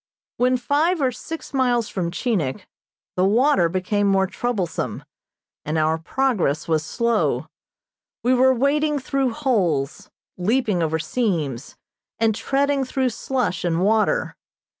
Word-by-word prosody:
When 255 +1 +3
five 300 +8 +1
or 265 -3 +2
six 320 +6 -8
miles 245 -4 +2
from 175 -3 -2
Chinik 170 - -2 0.5
the 185 - +1
water 205 - +3
became 190 +3 0
more 195 -1 +3
troublesome, 195 -3 -3 0.6
and 155 +2 -2
our 160 +1 +1
progress 180 - 0
was 160 -2 +1
slow. 235 +6 0 0.8
We 250 - +3
were 260 +1 +5
wading 295 +4 +1
through 270 -1 -1
holes, 185 - -1 0.3
leaping 215 -1 +1
over 160 0 0
seams, 160 - -2 0.4
and 225 -1 +2
treading 275 +4 0
through 260 0 0
slush 245 -3 -2
and 170 -1 0
water. 220 - +1
225 Hz, 125 wpm, -22 LUFS, 175-260 Hz, 0.8 s, were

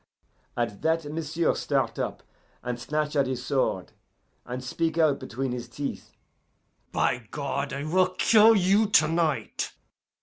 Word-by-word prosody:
"At 115 -4 -2
that 160 0 +1
m'sieu' 160 +2 -1
start - - -1
up - - -3 0.4
and 120 0 -3
snatch 150 +3 -2
at 140 -2 +3
his 130 -1 -4
sword, 130 -10 0 0.6
and 125 +1 -5
speak 160 +5 -2
out 155 -4 +3
between 130 +2 -4
his 120 -1 -5
teeth, 140 +3 -6 0.8
'By 125 -4 0
God, 140 -1 -3
I 140 +1 -4
will 185 +4 +2
kill 225 0 +6
you 200 +3 +3
to 160 -7 +5
night! 160 -2 -1
145 Hz, 140 wpm, -26 LUFS, 130-165 Hz, 0.8 s, kill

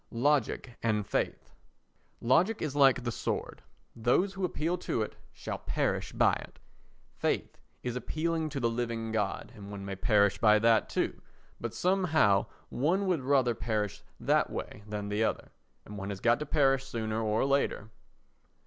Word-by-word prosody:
Logic 130 -1 0
and 105 -3 +1
Faith - - -2 0.7
Logic 180 - +3
is 145 -3 -3
like 135 -3 +5
the 120 - -1
sword—those 125 - -2
who 195 -1 -5
appeal 170 -1 0
to 115 - -1
it 105 - -7 0.2
shall - - -6
perish - - -1
by - - +3
it. - - -12 0.6
Faith - - -1 0.2
is 125 -1 -3
appealing 160 +4 -1
to 140 -2 -4
the 120 - +2
living 115 -1 -2
God, 105 -3 -2
and 100 -1 -10
one 100 -1 -7
may 95 0 -4
perish 100 +1 +3
by 105 -1 +6
that 115 0 +3
too, - - -1 0.4
but - - -5
somehow 160 - +3 0.2
one 175 +10 +1
would 180 -6 +1
rather 130 -2 +3
perish 110 -3 -2 0.2
that - - +2
way - - -6
than 105 -1 -4
the 105 +2 +1
other, - - -2 0.3
and 105 0 -8
one 95 +1 -4
has 100 -2 -4
got 120 +5 +3
to 150 - -4
perish 135 -3 +3
sooner 110 -4 -3
or 110 +2 +1
later. 135 -6 0
120 Hz, 160 wpm, -30 LUFS, 105-145 Hz, 0.7 s, by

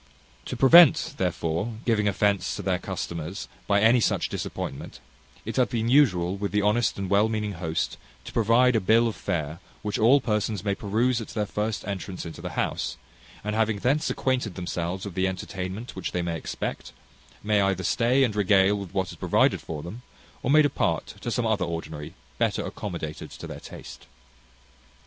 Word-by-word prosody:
To - - -5
prevent, 160 +2 +7
therefore, 90 +4 -1
giving 105 -3 +2
offence 100 -1 +1
to - - -6
their - - 0
customers 85 +3 -5 0.2
by 100 0 +3
any 115 +3 +6
such - - +1
disappointment, 65 - -5 0.5
it - - -4
hath 125 - +3
been 115 -1 -1
usual 95 -10 +4
with 100 0 -3
the 105 0 +1
honest 110 +3 +2
and 100 -1 -3
well 100 +3 +3
meaning 105 -2 -2
host 80 -3 -2 0.3
to - - -9
provide 120 +3 +4
a - - +4
bill 115 +5 +4
of 115 - -3
fare 80 -4 -3 0.2
which 105 -1 -2
all 120 +6 +6
persons 105 -4 -1
may 100 -1 +1
peruse 115 +4 0
at 110 - -7
their 105 -2 -2
first 105 +1 -3
entrance 95 -2 -5
into 80 - -8
the - - -6
house; - - -1 0.5
and 105 +1 -2
having 110 -1 +1
thence 140 +9 +1
acquainted 125 -7 -1
themselves 90 +1 -3
with 100 - -6
the 95 +2 +1
entertainment 95 +4 -5
which 95 - -4
they 90 - 0
may 85 -1 -2
expect, 80 - -5 0.5
may 105 -1 +3
either 95 -1 +1
stay 125 +8 +3
and 110 -5 0
regale 100 -1 +4
with 100 -3 -7
what 95 -1 0
is - - -11
provided - - +2
for 75 -2 -6
them, 95 +8 -8 0.4
or - - -2
may 155 +2 +6
depart 145 - 0
to - - -3
some 120 0 0
other 110 -4 +1
ordinary 80 -3 -6 0.2
better - - +1
accommodated 85 -6 -5
to - - -9
their - - -7
taste. - - -11
105 Hz, 180 wpm, -26 LUFS, 95-115 Hz, 0.5 s, prevent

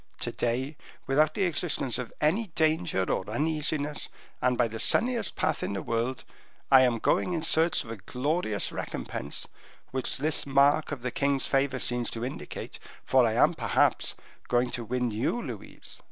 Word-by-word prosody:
To - - -1
day, 130 +5 -2 0.3
without 150 +3 +2
the 200 - 0
existence 155 -7 +3
of 125 - -5
any 190 +9 +1
danger 160 - +1
or 95 +1 -2
uneasiness, 150 +3 0 0.3
and 125 -1 +1
by 120 - +3
the 110 0 -7
sunniest 235 - +3
path - - -1
in - - -3
the 100 - -4
world, 120 +3 -2 0.5
I 135 -1 +8
am 125 -2 +3
going 180 - +1
in 165 -2 -2
search 165 +1 +3
of 115 - -9
a 115 - -6
glorious 125 - -1
recompense, - - -3 0.4
which 130 -1 -2
this 155 -1 +1
mark 140 +3 +3
of 135 -4 -5
the 125 - -2
king's 140 +1 +1
favor 135 -1 +1
seems 120 -2 +1
to 115 - -3
indicate, 130 - -7 0.3
for - - +4
I - - 0
am, - - +4
perhaps, - - +1 0.3
going 120 0 +1
to 120 - -4
win 125 +1 -2
you, 115 - -1
Louise. - - -8
135 Hz, 170 wpm, -28 LUFS, 120-155 Hz, 0.5 s, I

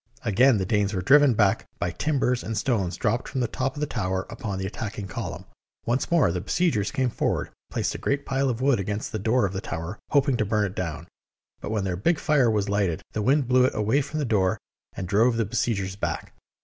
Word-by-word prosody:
Again 120 +3 +4
the 95 - -1
Danes 105 +1 +1
were 90 - -2
driven 140 +1 +6
back 100 -2 +2
by 85 0 -1
timbers 125 - 0
and 110 -1 -3
stones 95 -10 0
dropped 115 +4 0
from 130 - -3
the 120 - +1
top 130 +5 -2
of 145 - -6
the - - +2
tower 95 -7 -2
upon 105 -4 -4
the 95 - -3
attacking 105 0 -5
column. - - -5 0.4
Once 120 +3 0
more 165 - +4
the 90 0 -2
besiegers 110 - +1
came 130 -2 0
forward, - - -1 0.2
placed - - -1
a - - -6
great 140 0 -1
pile 135 0 0
of 120 0 -2
wood 135 -3 +3
against 105 +2 -3
the 110 - -3
door 115 +3 +2
of 95 - -3
the 95 - -3
tower, 80 +3 -5
hoping 140 -3 +3
to 110 - +1
burn 105 0 +1
it 95 0 -5
down; 85 -5 -4 0.5
but - - -6
when 105 -2 -1
their 90 -2 -2
big 160 - +2
fire 145 -7 +3
was 105 -2 +1
lighted, 100 -5 0
the 110 - -2
wind 135 +4 +2
blew 125 0 +4
it - - 0
away 110 +7 +2
from 155 +3 -5
the 150 - 0
door 95 -6 +2 0.4
and 95 - -5
drove 115 +5 +3
the 115 - +1
besiegers 100 -3 -1
back. 100 - -4
110 Hz, 230 wpm, -25 LUFS, 95-130 Hz, 0.5 s, driven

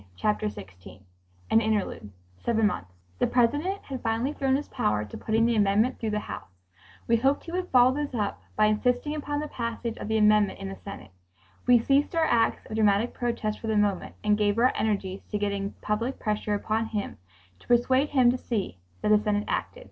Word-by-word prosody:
Chapter 105 +4 0
16 95 -1 -12 0.5
An 225 - +5
Interlude 215 - -1 0.3
(Seven 225 -2 +2
Months) 95 - -2 0.3
The - - +3
President 290 +11 +1
had 265 -2 -6
finally 230 +5 -1
thrown 270 -2 +1
his 290 +2 -2
power 105 0 0
to 105 - -10
putting 225 +1 +1
the 235 0 +2
amendment 210 +4 +2
through 225 - -2
the 210 0 -1
House. - - -8 0.6
We 230 - +4
hoped 270 +4 +1
he 335 - -8
would 360 +1 -2
follow 250 0 +5
this 290 -2 -3
up 205 -3 -2
by 215 - +4
insisting 245 +7 +1
upon 290 -1 -3
the 300 - -3
passage 235 -2 -4
of - - -6
the 220 0 +1
amendment 210 -2 +4
in 195 0 -6
the 195 - -8
Senate. 155 - -9 0.6
We 245 -1 +7
ceased 275 +7 +2
our 325 -1 +3
acts 235 -6 +1
of - - -8
dramatic 210 +2 +2
protest 230 -3 -2
for 225 - -6
the 220 -1 +1
moment 205 -3 0
and 210 0 +2
gave 205 0 +2
our 250 +2 +4
energies 200 -3 -1
to 210 - -1
getting 200 -1 -2
public 230 +5 -2
pressure 210 -1 -1
upon 220 +2 -1
him, 210 -3 -4 0.4
to - - -21
persuade 260 +4 +3
him 255 -4 +4
to 255 - -3
see 195 - -3 0.2
that - - +1
the 210 0 +6
Senate 210 -1 0
acted. - - -3
220 Hz, 200 wpm, -27 LUFS, 205-250 Hz, 0.6 s, We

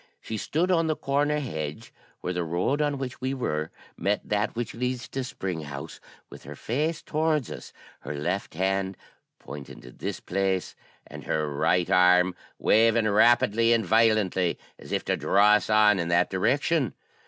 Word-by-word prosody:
She 110 - -6
stood 165 - 0
on 165 -2 +2
the 155 - +1
corner 145 +2 0
hedge, 80 - -5 0.3
where 90 - -3
the 90 -1 -1
road 90 - 0
on 145 -1 0
which 130 -2 -6
we 130 +1 -1
were 75 - -2 0.3
met 100 +1 -1
that 105 +2 -1
which 120 0 -3
leads 125 +1 -3
to 135 - -3
Spring 95 -9 -4
House, 70 -2 -8 0.3
with - - -13
her 75 +2 -9
face 150 - -2
towards 155 -3 0
us, - - -9 0.3
her 75 - -6
left 85 +5 -3
hand 95 +1 -1 0.4
pointing 70 -2 -10
to 60 - -12
this - - -5
place, 95 0 -1 0.3
and - - -11
her 75 -1 -1
right 85 +4 +1
arm 90 0 +4 0.2
waving 115 0 +3
rapidly 115 +1 +4
and 115 -2 +1
violently 105 -4 +2 0.2
as - - -12
if - - -1
to - - +1
draw 105 +2 +4
us 105 +1 +3
on 105 -2 +5
in 85 - -1
that 85 0 +2
direction. 140 - +1
105 Hz, 170 wpm, -26 LUFS, 90-130 Hz, 0.4 s, on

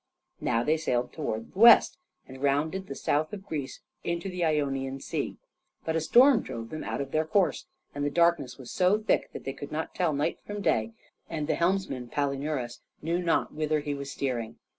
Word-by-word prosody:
Now 115 +1 +1
they 155 +5 +2
sailed 125 -5 -1
towards 115 -8 -4
the 190 - -8
west, 235 +8 +8 0.3
and 130 0 -11
rounded 155 +7 0
the 140 - -6
south 155 +5 0
of 195 -2 -7
Greece 145 -4 -5 0.2
into 170 +3 -2
the 180 -1 -2
Ionian 135 -4 0
Sea. - - -3 0.5
But 160 - -1
a 165 - +1
storm 250 - +6
drove 115 0 -6
them 155 - -5
out - - -3
of 135 -1 -5
their 155 - +2
course, 180 +4 +1 0.3
and 145 - -3
the 145 - +1
darkness 170 -4 +2
was 130 -3 -9
so 185 +3 +3
thick 215 - +1
that - - -8
they 135 - -4
could 145 +1 -8
not 155 +1 -3
tell 180 -4 +1
night 150 +4 -1
from 205 -1 -5
day, 110 - +1 0.4
and 155 -3 -2
the 160 - +1
helmsman, 170 -9 0
Palinurus, 140 -3 -2 0.2
knew 170 +3 0
not 170 -2 +1
whither 155 0 0
he 145 0 -3
was 140 0 -5
steering. 125 -5 -3
150 Hz, 200 wpm, -28 LUFS, 135-170 Hz, 0.5 s, west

